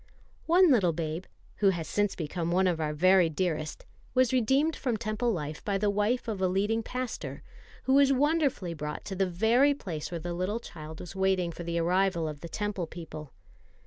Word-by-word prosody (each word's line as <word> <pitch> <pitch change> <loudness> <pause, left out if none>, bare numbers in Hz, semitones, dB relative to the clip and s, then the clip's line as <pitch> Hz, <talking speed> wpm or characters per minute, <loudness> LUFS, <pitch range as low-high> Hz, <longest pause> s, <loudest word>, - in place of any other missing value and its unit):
One 350 0 +6
little 190 -10 +4
babe, 160 +2 -3 0.3
who 200 - +4
has 170 -4 -2
since 205 +2 0
become 165 +1 -3
one 185 +2 +3
of 170 -3 +1
our 155 -1 0
very 180 +3 +4
dearest, 155 -2 -2 0.3
was 255 -1 +3
redeemed 270 +6 +2
from 245 -5 -1
Temple 215 +3 -1
life 150 -5 -4
by 200 -1 0
the 205 +1 +1
wife 210 +5 0
of 210 -4 -3
a 185 - +3
leading 205 +5 +1
pastor, 250 +1 -5 0.4
who 265 - +2
was 275 0 +6
wonderfully 280 - +1
brought 150 -1 -5
to 195 - -5
the 190 0 +1
very 235 +10 +3
place 165 - -5
where 175 - -4
the 175 +2 -4
little 185 +6 -1
child 160 -7 -9
was 180 - -9
waiting 190 -2 +1
for 170 - -9
the 170 0 -2
arrival 175 0 +1
of 150 -2 -6
the 170 - -7
Temple 205 -4 -3
people. 155 -3 -9
190 Hz, 195 wpm, -29 LUFS, 170-225 Hz, 0.4 s, One